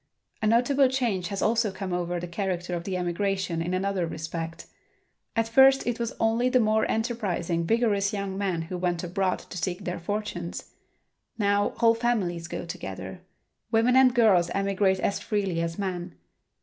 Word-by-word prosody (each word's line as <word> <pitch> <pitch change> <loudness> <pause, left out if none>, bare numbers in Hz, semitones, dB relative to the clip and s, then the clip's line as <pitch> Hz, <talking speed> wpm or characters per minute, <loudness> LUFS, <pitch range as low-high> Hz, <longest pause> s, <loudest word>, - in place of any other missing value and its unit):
A 215 - +1
notable 250 +5 +4
change 235 -9 -1
has 200 -1 -3
also 225 -1 +2
come 190 -1 -5
over 175 0 -1
the 175 - -5
character 180 -1 -3
of 170 -1 -3
the 190 -2 -2
emigration 180 -1 -1
in 175 +2 -1
another 190 -2 -1
respect. 165 +1 -5 0.7
At 225 0 +1
first 265 +3 +6
it 240 0 -1
was 235 +1 -3
only 225 +3 +2
the 255 - +4
more 220 -1 +2
enterprising, 195 -8 -1
vigorous 210 -3 +2
young 200 -2 -3
men 190 -4 -1
who 180 +2 -5
went 175 -1 -1
abroad 185 +1 0
to 180 - -8
seek 180 +3 -3
their 180 -1 -3
fortunes. 175 -2 -4 0.7
Now 205 -1 +1
whole 230 -1 +5
families 205 -8 -1
go 170 - -5
together. 165 - -7 0.5
Women 230 +2 +3
and 260 -1 +6
girls 195 -8 +4
emigrate 195 -1 +1
as 200 - 0
freely 195 -5 -1
as 165 0 -3
men. 180 -3 -4
195 Hz, 165 wpm, -26 LUFS, 175-225 Hz, 0.7 s, first